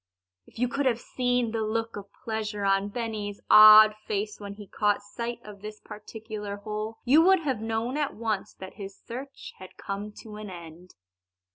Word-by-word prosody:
If - - -19
you 250 +2 +1
could 275 +3 -1
have 235 -2 +1
seen 245 -2 -1
the 225 0 -2
look 225 +1 -2
of 200 -1 -9
pleasure 215 -2 -3
on 195 +1 +2
Benny's 215 -2 -4
odd 215 0 +10
face 210 +1 -2
when 200 -1 -7
he 205 0 -10
caught 205 +1 0
sight 235 +3 -5
of 205 -2 -12
this 215 0 -8
particular 210 -1 -7
hole 215 +1 -5
you 285 +6 +6
would 375 +1 +5
have 265 -8 -2
known 225 +4 -2
at 295 -2 -1
once 220 -3 -3
that 190 0 -10
his 195 -2 -9
search 265 +4 -9
had 185 - -12
come 200 +2 -5
to 215 -2 -10
an 210 -1 -7
end. 175 0 -11
215 Hz, 180 wpm, -27 LUFS, 205-230 Hz, -, odd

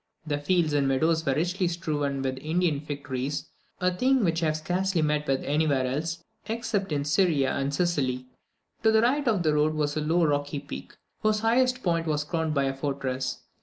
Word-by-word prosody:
The 145 -2 -1
fields 160 0 +1
and 140 -2 +2
meadows 160 +5 +2
were 135 -3 +1
richly 180 +4 0
strewed 145 -5 -2
with 130 0 -2
Indian 160 0 0
fig 145 -1 -6
trees, 135 +2 -3 0.3
a 180 -1 +1
thing 260 +4 +3
which 165 -2 +1
I 165 - +2
have 155 0 0
scarcely 180 +2 0
met 150 0 0
with 135 -1 +1
anywhere 145 -3 +1
else, 155 +6 -3 0.2
except 220 -4 -2
in 145 -1 0
Syria 150 -3 +2
and 140 0 -1
Sicily; 140 -6 0 0.6
to 220 - +4
the 220 0 +4
right 275 +3 +2
of 205 -6 +2
the 155 -2 +2
road 150 +1 +2
was 150 -1 0
a 155 - 0
low 165 +3 +2
rocky 145 0 0
peak, 140 0 -8 0.3
whose 215 0 +2
highest 255 +3 +2
point 170 -2 0
was 150 -1 0
crowned 160 0 -2
by 140 - +2
a 135 0 0
fortress. 135 -2 -3
155 Hz, 200 wpm, -27 LUFS, 140-180 Hz, 0.6 s, to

